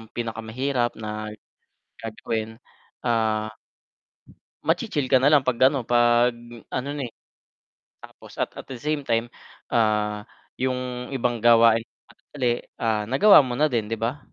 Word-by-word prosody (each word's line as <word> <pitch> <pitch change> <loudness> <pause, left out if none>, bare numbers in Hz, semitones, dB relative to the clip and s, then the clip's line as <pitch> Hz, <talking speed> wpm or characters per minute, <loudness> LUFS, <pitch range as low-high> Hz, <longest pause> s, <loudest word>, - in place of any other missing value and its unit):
pinakamahirap 120 +2 -2
na 110 0 -5 0.7
gagawin, 110 0 -4 0.5
ah 110 -2 0 1.1
machi-chill 140 -4 0
ka 130 - +6
nalang 145 +2 +5
'pag 130 -2 0
ano 140 -2 -2
'pag 120 +1 +3 0.4
ano 130 +2 -3
na, 145 - -4
eh - - -32 0.9
tapos - - -14
at - - -2
at - - -9
the 130 - -7
same 150 0 -2
time, 115 0 0 0.4
ah, 105 -2 +1 0.3
yung 125 0 -3
ibang 120 -2 0
gawain 115 -1 +6
kung - - -26
sakali, 135 -4 -5 0.4
ah, 110 -2 +1
nagawa 140 - +7
mo 125 - -3
na 150 +5 +2
din 115 -4 -1
'di 115 - -3
ba? 120 +5 -1
120 Hz, 135 wpm, -24 LUFS, 110-130 Hz, 1.1 s, nagawa